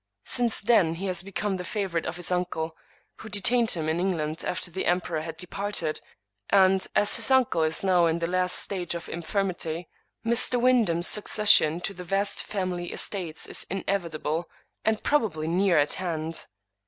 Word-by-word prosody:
Since 240 Hz, -2 st, +3 dB
then 200 Hz, -7 st, +1 dB
he 185 Hz, +4 st, -7 dB
has 185 Hz, -2 st, +3 dB
become 195 Hz, +1 st, -4 dB
the 180 Hz, -, -7 dB
favorite 185 Hz, -4 st, -4 dB
of -, -, -5 dB
his 175 Hz, +1 st, +1 dB
uncle, 170 Hz, -3 st, -3 dB, 0.4 s
who 220 Hz, -, -11 dB
detained 225 Hz, +3 st, +3 dB
him 160 Hz, -3 st, 0 dB
in 160 Hz, +2 st, -2 dB
England 165 Hz, -4 st, -3 dB
after 180 Hz, 0 st, -4 dB
the 190 Hz, +3 st, -4 dB
emperor 175 Hz, -2 st, -2 dB
had 160 Hz, 0 st, -8 dB
departed 180 Hz, -2 st, -2 dB, 0.3 s
— 100 Hz, 0 st, -23 dB
^and, 190 Hz, -1 st, +3 dB
as 205 Hz, -, +6 dB
this -, -, +6 dB
uncle 260 Hz, -10 st, +1 dB
is 160 Hz, +3 st, +1 dB
now 180 Hz, -3 st, +2 dB
in 165 Hz, 0 st, -1 dB
the 170 Hz, -, -3 dB
last 180 Hz, +1 st, 0 dB
stage 180 Hz, -3 st, -1 dB
of 170 Hz, -, -8 dB
infirmity, 170 Hz, -2 st, -4 dB, 0.4 s
Mr. 235 Hz, +1 st, +3 dB
Wyndham's 230 Hz, -9 st, +2 dB
succession 205 Hz, -6 st, +5 dB
to 195 Hz, -, -3 dB
the 180 Hz, -1 st, -10 dB
vast 195 Hz, +3 st, +1 dB
family 180 Hz, -3 st, -5 dB
estates 175 Hz, -6 st, -1 dB
is -, -, -1 dB
inevitable, 170 Hz, -4 st, -4 dB, 0.3 s
and 220 Hz, 0 st, -2 dB
probably 200 Hz, -, -1 dB
near 180 Hz, +1 st, +1 dB
at 145 Hz, 0 st, +1 dB
hand. 165 Hz, -3 st, -4 dB
180 Hz, 170 wpm, -25 LUFS, 165-200 Hz, 0.4 s, as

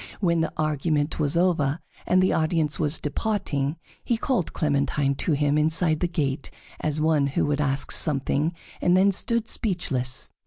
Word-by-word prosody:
When 170 Hz, -4 st, +2 dB
the 160 Hz, -, -1 dB
argument 155 Hz, 0 st, 0 dB
was 150 Hz, +1 st, +1 dB
over 165 Hz, -4 st, +1 dB, 0.3 s
and 185 Hz, 0 st, +4 dB
the 185 Hz, -, +2 dB
audience 155 Hz, -1 st, 0 dB
was 150 Hz, 0 st, +1 dB
departing, 150 Hz, -4 st, -2 dB, 0.3 s
he 235 Hz, -, 0 dB
called 225 Hz, -, -1 dB
Clementine 140 Hz, -1 st, 0 dB
to 150 Hz, +4 st, -1 dB
him 145 Hz, +1 st, +2 dB
inside 160 Hz, +1 st, +2 dB
the 175 Hz, -, +1 dB
gate 145 Hz, -5 st, -2 dB, 0.3 s
as 155 Hz, 0 st, -1 dB
one 155 Hz, -2 st, +2 dB
who 140 Hz, -, 0 dB
would 145 Hz, 0 st, 0 dB
ask 135 Hz, -1 st, -1 dB
something, 150 Hz, +2 st, 0 dB, 0.3 s
and 180 Hz, +1 st, +4 dB
then 195 Hz, +2 st, +5 dB
stood 230 Hz, +3 st, +2 dB
speechless. 135 Hz, -, -2 dB
155 Hz, 160 wpm, -25 LUFS, 145-175 Hz, 0.3 s, then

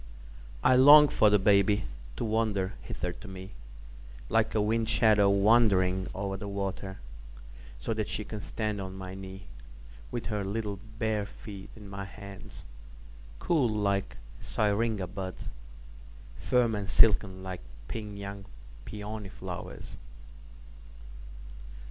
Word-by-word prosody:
I 130 Hz, -, +6 dB
long 145 Hz, +3 st, +9 dB
for 105 Hz, -, +4 dB
the 105 Hz, -, +5 dB
baby 100 Hz, +1 st, +4 dB, 0.3 s
to -, -, -2 dB
wander 105 Hz, -3 st, 0 dB
hither 90 Hz, +1 st, -4 dB
to 105 Hz, -, -12 dB
meLike -, -, -5 dB
a -, -, +3 dB
wind 110 Hz, +2 st, +1 dB
shadow 105 Hz, -4 st, +5 dB
wandering 100 Hz, -3 st, +4 dB
over 95 Hz, 0 st, -2 dB
the 100 Hz, -, -6 dB
water, 100 Hz, -1 st, -4 dB, 0.8 s
So 115 Hz, -, -2 dB
that 110 Hz, -1 st, -2 dB
she 105 Hz, -, -3 dB
can 105 Hz, 0 st, -6 dB
stand 105 Hz, -2 st, -3 dB
on 95 Hz, 0 st, -6 dB
my 95 Hz, -1 st, -7 dB
kneeWith 95 Hz, -, -10 dB
her 105 Hz, -2 st, -1 dB
little 100 Hz, 0 st, -3 dB, 0.2 s
bare 110 Hz, -2 st, 0 dB
feet 100 Hz, -1 st, -10 dB
in 105 Hz, -2 st, -11 dB
my 100 Hz, 0 st, -6 dB
hands, 100 Hz, +2 st, -11 dB, 0.7 s
Cool 150 Hz, -9 st, +2 dB
like 100 Hz, -2 st, 0 dB, 0.2 s
syringa 105 Hz, -1 st, 0 dB
buds, 95 Hz, 0 st, -6 dB, 0.9 s
Firm 120 Hz, -2 st, +2 dB
and 105 Hz, -1 st, -3 dB
silken 95 Hz, -4 st, +4 dB
like 95 Hz, -1 st, -6 dB, 0.3 s
pink 105 Hz, +1 st, -6 dB
young 100 Hz, 0 st, -7 dB, 0.4 s
peony 105 Hz, -1 st, -6 dB
flowers. 90 Hz, -2 st, -8 dB
100 Hz, 120 wpm, -29 LUFS, 95-110 Hz, 0.9 s, long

